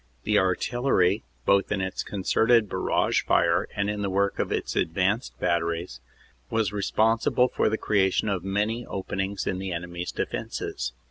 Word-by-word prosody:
The 105 -1 +3
Artillery, 95 +1 +1 0.2
both 100 0 +3
in 100 - 0
its 95 0 -2
concerted 110 +3 +2
barrage - - +1
fire - - +2
and 100 0 0
in 105 0 -2
the 100 - -1
work 100 +1 0
of - - -1
its - - -2
advanced 95 - 0
batteries, 85 -2 -1 0.5
was 110 -2 0
responsible 115 +4 +2
for - - +1
the 110 - -1
creation 100 -1 +1
of 95 -4 -1
many 105 +5 -1
openings 95 0 -3
in 95 - -1
the 95 -1 -4
enemy 85 0 -5
s 90 - -3
defenses. - - -4
100 Hz, 155 wpm, -26 LUFS, 95-105 Hz, 0.5 s, The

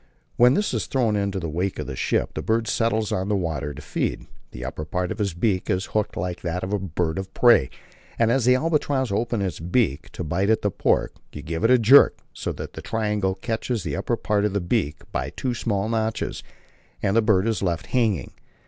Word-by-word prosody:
When 125 +2 +5
this 210 - 0
is - - -1
thrown 120 -6 +1
in 100 -1 0
the 95 -4 -3
wake 90 +5 -2
of - - -4
the 65 - -5
ship, - - 0
the - - -3
bird 115 0 0
settles 110 -2 0
on 95 +2 -1
the 105 - +2
water 80 -6 -2
to 75 +1 -9
feed. 75 - -2 0.2
The 60 +1 -8
upper 70 +4 -5
part 90 +4 -2
of - - -3
its 100 -5 -1
beak 95 0 0
is 95 +1 0
hooked 105 -1 0
like 90 0 -3
that 90 +1 -3
of 95 +2 -3
a 105 - +1
bird 85 -1 -2
of 95 - -6
prey, 120 - +5 0.5
and 115 0 +3
as 130 -1 +2
the 125 0 +6
albatross 145 -4 0
opens 115 +1 0
its 95 - -3
beak 90 - 0
and 90 - -4
bites 95 +6 0
at 110 - -2
the 105 - +1
pork, - - +1 0.2
you 75 - -7
give 80 +1 -4
a 125 +2 +6
jerk, 125 +5 +7 0.2
so - - -3
that - - -7
the - - -7
triangle 105 -4 -1
catches 110 +2 -3
the 80 -3 -3
upper 110 +5 -1
part 105 -2 0
of 105 -2 0
the 100 - +1
beak 85 -5 -1
by - - -2
two 130 -2 -3
small 105 -4 -1
notches, 110 -1 -2 0.6
and 100 0 +1
the 115 - +5
bird 105 -2 +3
is 110 -4 0
left 85 -4 -1
hanging. 110 - 0
100 Hz, 225 wpm, -24 LUFS, 90-115 Hz, 0.6 s, jerk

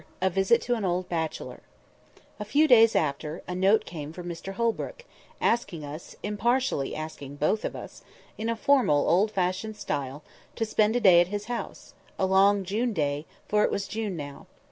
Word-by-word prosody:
A 190 +1 +1
VISIT 195 +6 +3
TO 245 - 0
AN 225 -3 -2
OLD 180 0 -1
BACHELOR 160 -2 -4 0.8
A - - -2
FEW 290 +9 +3
days 225 -4 +6
after, 150 +2 -1
a 180 - -3
note 190 +4 +3
came 155 -3 -7
from 175 +1 -8
Mr 175 +3 -6
Holbrook, 235 - -2 0.3
asking 195 -10 0
us—impartially 205 - -2
asking 150 -3 -7
both 155 +9 0
of - - -3
us—in 225 +1 -9
a 230 - 0
formal, 230 - +3
old 195 +5 +3
fashioned 190 +2 -2
style, 140 -5 -4 0.3
to 225 - -1
spend 215 +1 +2
a - - +3
day 180 -6 +7
at 175 - +1
his 205 +2 -4
house—a 235 -4 -5
long 195 +1 +4
June 220 +6 -1
day—for 150 +6 -1
it - - +3
was 200 0 -2
June 215 -5 -3
now. 145 -2 -8
195 Hz, 165 wpm, -27 LUFS, 160-220 Hz, 0.8 s, day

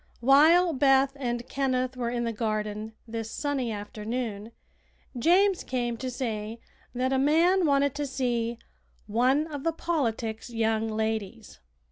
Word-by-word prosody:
While 315 +7 +5
Beth 270 0 +3
and 240 -2 -3
Kenneth 255 -2 -1
were 240 -2 -2
in 240 0 -2
the 230 -1 -2
garden 215 0 -3
this 225 0 -5
sunny 270 -3 -2
afternoon 215 +1 -5 0.6
James 360 +8 +3
came 240 -2 -2
to 260 +2 -4
say 225 -3 -4 0.4
that 260 +2 0
a 265 - +2
man 335 +6 +3
wanted 280 -1 +2
to 290 0 -3
see 240 -3 -1 0.5
"one 255 +8 +2
of 290 -4 -7
the 330 - +1
politics 235 -9 -2
young 225 -1 0
ladies." 220 -1 -3
245 Hz, 135 wpm, -27 LUFS, 225-280 Hz, 0.6 s, While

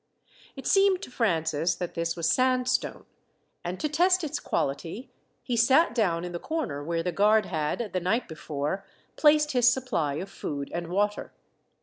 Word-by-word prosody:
It 270 - -9
seemed 390 -2 +3
to - - -8
Francis 165 -7 0
that 175 - -5
this 165 -1 -2
was 165 -2 -1
sandstone, 255 +4 +1 0.6
and 180 +1 -4
to - - 0
test 360 +4 +3
its 300 -1 -2
quality, 165 - -3 0.3
he 245 - -2
sat 260 +7 +4
down 180 -8 +1
in 175 - -5
the 175 - -4
corner 275 - -3
where 165 +2 -2
the 180 - -1
guard 210 +4 +3
had, 170 +7 -2
the 185 - +1
night 200 +8 0
before, 155 +3 -4 0.3
placed 300 0 +4
his 245 -1 +5
supply 170 - -1
of 185 +6 -4
food 140 -1 -5
and 170 0 -3
water. 205 +4 -1
200 Hz, 165 wpm, -27 LUFS, 165-255 Hz, 0.6 s, his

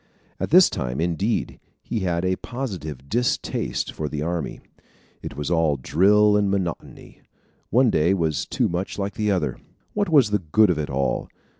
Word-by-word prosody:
At - - -2
this 180 +3 +7
time, 65 +1 -3
indeed, 90 +7 -1 0.2
he 115 - -3
had 90 -2 -1
a 95 0 +1
positive 85 - -6
distaste 120 - -1
for 75 -1 -4
the 75 +1 -3
army. 85 -3 -3 0.6
It - - -8
was 75 +3 -3
all 80 -4 +2
drill 105 +10 +4
and 100 -1 +2
monotony. 95 -4 -4 0.5
One 125 +1 +4
day 85 +5 +3
was 80 -5 -1
too - - 0
much 90 +3 -3
like 100 +1 -4
another. 95 - 0 0.3
What 205 -3 0
was 140 -9 +4
the 105 - +2
good 95 +4 +3
of 80 - -1
it 75 - -3
all? 70 0 -1
90 Hz, 165 wpm, -23 LUFS, 75-105 Hz, 0.6 s, this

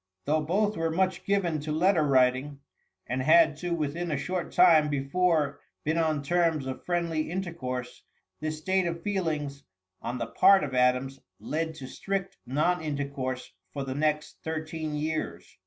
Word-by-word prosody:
Though 155 +2 +2
both 205 +7 0
were 165 0 0
much 185 +2 0
given 185 -6 +1
to 150 +1 -4
letter 170 +2 +3
writing, 135 0 +2 0.5
and 130 +1 -2
had 160 +2 +5
to 175 +3 -4
within 165 +2 -2
a 150 - 0
short 180 +5 -3
time 165 -4 +6
before 145 +1 +1 0.2
been 160 +2 0
on 155 -3 +1
terms 165 -2 +1
of 130 -1 -5
friendly 170 -3 -1
intercourse, 140 -9 -4 0.4
this 155 0 -3
state 185 +3 +1
of 170 0 -4
feelings, 155 -8 -2 0.4
on 120 +2 -3
the 115 - -2
part 195 +11 +5
of 140 -3 -4
Adams, 125 +1 +2 0.2
led 160 +1 -3
to 140 - -8
strict 195 +6 -3
non 155 +7 +1
intercourse 140 -4 -4 0.2
for 140 - -3
the 130 -1 -4
next 150 +1 -1
thirteen 155 -1 -4
years. 155 +1 -4
155 Hz, 155 wpm, -28 LUFS, 140-175 Hz, 0.5 s, time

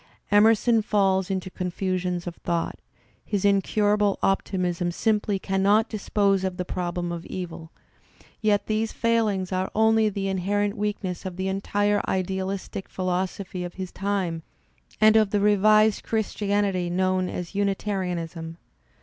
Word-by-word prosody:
Emerson 220 +2 +5
falls 195 -3 +1
into 190 -1 -3
confusions 180 -1 -2
of 175 - -4
thought; 170 -1 -2 0.4
his 205 -1 -2
incurable 205 +1 +2
optimism 180 -2 0
simply 210 +1 0
cannot 195 +3 +2
dispose 200 -2 +1
of 185 -1 -2
the 180 - -3
problem 175 -1 -3
of 170 -1 -5
evil; 165 -3 -7 0.7
yet 210 -2 +2
these 215 +1 -1
failings 215 -5 0
are 185 0 -1
only 220 0 +4
the 195 -1 -3
inherent 200 +2 0
weakness 205 -4 -3
of 185 -2 -5
the 190 +1 -2
entire 205 +2 +1
idealistic 190 +1 -3
philosophy 185 0 -3
of 175 0 -7
his 185 -1 -6
time 190 -4 -2 0.6
and 215 0 +6
of 215 -2 +5
the 205 - +1
revised 215 +1 +4
Christi 215 -2 -2
anily 195 -4 +1
known 185 +1 +1
as 180 0 -5
Unitarianism. 180 -5 -2
195 Hz, 130 wpm, -25 LUFS, 180-205 Hz, 0.7 s, and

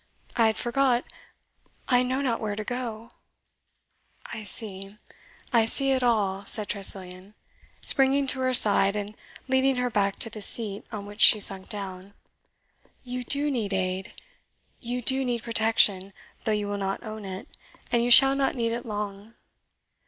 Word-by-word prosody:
I 230 -2 +3
had 220 - -1
forgot 250 0 0 0.8
I 250 -1 +3
know 255 +2 -2
not 245 -5 -2
where 210 -2 -4
to 215 - -5
go 235 -1 -6 0.6
" - - -19
"I 225 - -6
see 200 -1 -5 0.6
I 230 -2 +3
see 270 +4 +1
it 260 -1 0
all," 205 -5 0
said 210 0 +1
Tressilian, 190 0 -1 0.5
springing 275 0 +3
to 265 0 -1
her 255 0 -1
side, 200 -2 +6
and 205 0 -6 0.3
leading 265 0 +1
her 250 0 -2
back 200 -2 0
to 225 - -1
the 215 - -9
seat, 205 -1 -2
on 205 -2 -7
which 205 +1 -9
she 215 - +8
sunk 195 -2 +2
down. 195 -2 -8 0.9
"You 250 0 -6
DO 285 +4 +1
need 220 -6 -3
aid 190 +2 -3 0.7
you 245 +1 -5
do 265 +3 +2
need 240 -3 -3
protection, 220 -4 +1 0.3
though 220 - 0
you 210 -1 -2
will 205 0 -4
not 195 +2 -4
own 215 -2 -8
it; 190 -1 -8 0.4
and 235 0 +1
you 240 - -1
shall 270 +3 +9
not 275 0 -1
need 230 -2 -2
it 235 +1 -6
long. 210 +1 -7
220 Hz, 165 wpm, -25 LUFS, 200-250 Hz, 0.9 s, shall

